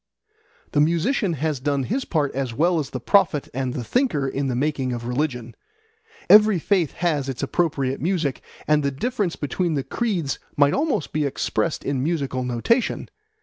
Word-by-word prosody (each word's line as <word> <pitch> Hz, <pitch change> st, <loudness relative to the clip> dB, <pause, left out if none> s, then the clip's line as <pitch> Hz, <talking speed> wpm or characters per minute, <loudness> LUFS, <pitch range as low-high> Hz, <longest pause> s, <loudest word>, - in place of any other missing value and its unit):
The 145 Hz, -, +3 dB
musician 170 Hz, -, +1 dB
has 155 Hz, -1 st, -1 dB
done 140 Hz, 0 st, 0 dB
his 255 Hz, -, -2 dB
part 150 Hz, -5 st, 0 dB
as 130 Hz, -3 st, -3 dB
well 170 Hz, +4 st, +2 dB
as 145 Hz, -, -3 dB
the 130 Hz, -, -5 dB
prophet 170 Hz, -, +2 dB
and 130 Hz, 0 st, -2 dB
the 125 Hz, -, -3 dB
thinker 170 Hz, -, 0 dB
in 135 Hz, +1 st, -2 dB
the 125 Hz, -, -1 dB
making 135 Hz, -1 st, -1 dB
of 120 Hz, -1 st, -5 dB
religion. 125 Hz, -2 st, -2 dB, 0.7 s
Every 210 Hz, -1 st, +7 dB
faith 175 Hz, -3 st, +1 dB
has 150 Hz, -6 st, -1 dB
its 130 Hz, +1 st, -4 dB
appropriate 140 Hz, -4 st, 0 dB
music, 165 Hz, -5 st, -1 dB, 0.3 s
and 150 Hz, 0 st, +4 dB
the 140 Hz, -, +1 dB
difference 195 Hz, -, -2 dB
between 165 Hz, +3 st, -1 dB
the 140 Hz, -, -1 dB
creeds 185 Hz, -, -2 dB, 0.2 s
might 145 Hz, 0 st, +4 dB
almost 280 Hz, -, -1 dB
be 155 Hz, 0 st, +1 dB
expressed 145 Hz, +3 st, -1 dB
in 135 Hz, -2 st, -1 dB
musical 140 Hz, -4 st, -1 dB
notation. 125 Hz, -, 0 dB
150 Hz, 170 wpm, -23 LUFS, 135-175 Hz, 0.7 s, Every